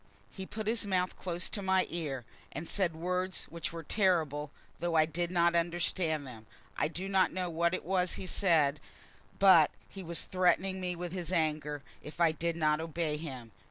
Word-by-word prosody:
He 190 -1 -7
put 215 0 -5
his 225 +2 0
mouth 185 -2 0
close 175 -1 -3
to 205 - -4
my 190 -1 +2
ear, 145 -7 -3 0.3
and 160 +4 -6
said 180 -5 0
words 180 +2 -2
which 165 0 -3
were 165 -1 -7
terrible, 160 -7 +1 0.3
though 170 0 -1
I 155 -1 +6
did 170 +2 -2
not 170 -1 +3
understand 170 -2 0
them. 115 -4 -11 0.3
I - - +1
do 180 +4 -4
not 190 -1 +3
know 180 -2 -2
what 170 +2 +1
it - - -7
was 180 0 +1
he - - -5
said, 155 -7 +3 0.6
but 185 -6 +7 0.2
he 195 - -9
was 170 -2 0
threatening 185 +1 +1
me 180 -1 -1
with 175 0 -5
his 180 -2 -3
anger 150 -4 0 0.2
if 150 - -10
I 170 -2 +5
did 165 +1 -2
not 155 -1 +2
obey 160 -2 -2
him. 130 -7 -7
170 Hz, 190 wpm, -31 LUFS, 155-185 Hz, 0.6 s, but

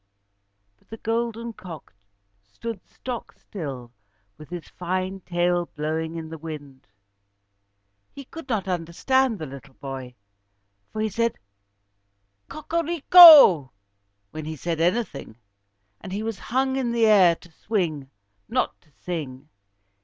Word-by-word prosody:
But - - -34
the 225 - -8
golden 230 +1 -3
cock 170 - -11 0.5
stood 195 - -8
stock 250 -2 -7
still, 135 - -8 0.4
with 155 - -14
his 175 -4 -7
fine 185 +2 -4
tail 175 -1 0
blowing 160 +2 -3
in 165 -1 -6
the 160 0 -8
wind. 145 -4 -9 1.2
He 275 - -11
could 325 0 -11
not 215 -5 -1
understand 205 +9 0
the 160 - -6
little 135 -1 -12
boy, 130 -2 -8 0.8
for 215 - -4
he 220 - 0
said 230 +3 -1 1.1
"Cocorico" 320 - +7 0.6
when 155 -1 -7
he 155 +1 -5
said 165 +1 -3
anything. 175 - -1 0.7
But 185 - -8
he 205 +2 -3
was 225 -2 -4
hung 265 +2 -1
in 250 -3 -1
the 230 -1 +3
air 190 -6 +6
to 175 +1 -19
swing, 160 -8 -3 0.4
not - - -1
to - - -29
sing. 150 -5 -6
180 Hz, 125 wpm, -24 LUFS, 155-230 Hz, 1.2 s, Cocorico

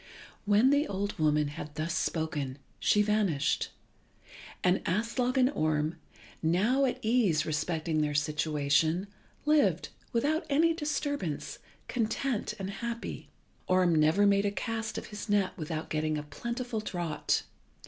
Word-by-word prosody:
When 210 +6 +5
the 290 +1 +3
old 200 0 -3
woman 150 -1 +2
had 150 0 -8
thus 155 +3 -2
spoken 155 -7 -2 0.2
she 210 - +4
vanished, 200 -9 +1 0.9
and 180 +1 +3
Aslog 235 +7 0
and 260 +1 +4
Orm, 155 - 0 0.5
now 210 +12 +3
at 255 - 0
ease 215 -10 +3
respecting 155 +1 -1
their 150 -1 0
situation, 150 +3 +1 0.4
lived, 300 -1 +3 0.2
without 310 +7 0
any 325 +4 +4
disturbance, 285 - -3 0.3
content 240 0 -1
and 195 0 -4
happy. 235 +3 -5 0.4
Orm 185 -2 +4
never 160 +6 +4
made 200 0 +4
a - - +3
cast 225 +1 -3
of - - -5
his 210 +1 -6
net 205 -2 +2
without 155 -1 -5
getting 155 0 0
a 150 - -4
plentiful 235 - -4
draught. 175 -7 -1
190 Hz, 130 wpm, -30 LUFS, 155-235 Hz, 0.9 s, When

